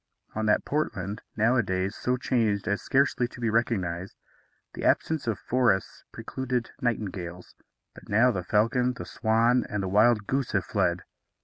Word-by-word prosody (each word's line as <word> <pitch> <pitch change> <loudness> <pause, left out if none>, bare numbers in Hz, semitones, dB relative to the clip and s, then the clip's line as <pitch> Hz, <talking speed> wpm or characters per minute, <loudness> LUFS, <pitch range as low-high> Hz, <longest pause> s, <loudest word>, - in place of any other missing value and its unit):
On 110 0 -1
that 105 - +2
Portland 105 - -2 0.2
nowadays 105 -4 +1
so 125 +1 -1
changed 115 -5 0
as 100 0 0
scarcely 135 -2 +2
to 125 - -13
be 115 -2 0
recognized 95 -6 -1 0.6
the - - -7
absence 160 -5 +1
of 110 - 0
forests 120 -7 0
precluded 125 -2 -3
nightingales; 95 -7 -3 0.4
but - - -15
now 120 +5 +4
the 95 -5 -2
falcon, 115 +6 +2
the - - -7
swan, 115 +2 +2
and 105 -1 -2
the - - -2
wild 105 +2 +4
goose 135 +3 -1
have - - +1
fled. 85 0 0
110 Hz, 150 wpm, -27 LUFS, 100-125 Hz, 0.6 s, now